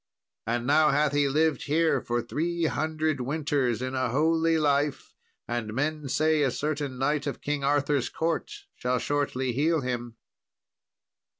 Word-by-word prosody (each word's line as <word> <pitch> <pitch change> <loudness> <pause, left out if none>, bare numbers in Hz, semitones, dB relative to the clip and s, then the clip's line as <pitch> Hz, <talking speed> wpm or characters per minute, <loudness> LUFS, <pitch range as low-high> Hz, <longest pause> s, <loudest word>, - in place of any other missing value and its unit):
And 120 +1 -1
now 150 +3 +4
hath 150 +1 +2
he 145 -1 +3
lived 155 0 +1
here 155 -2 +2
for 120 0 -2
three 170 +7 -1
hundred 155 -2 -1
winters 135 -3 -1
in 130 0 -3
a 130 -2 0
holy 160 +5 +2
life, 145 -1 0 0.3
and 115 -2 -3
men 150 +1 -2
say 155 +2 +2
a 140 - +3
certain 145 0 -3
knight 145 +2 0
of 140 - -3
King 145 -1 -2
Arthur's 145 -1 +1
court 165 - -2 0.2
shall 125 0 -1
shortly 130 -2 -1
heal 155 +4 +1
him." 120 -2 -4
145 Hz, 145 wpm, -27 LUFS, 130-155 Hz, 0.3 s, now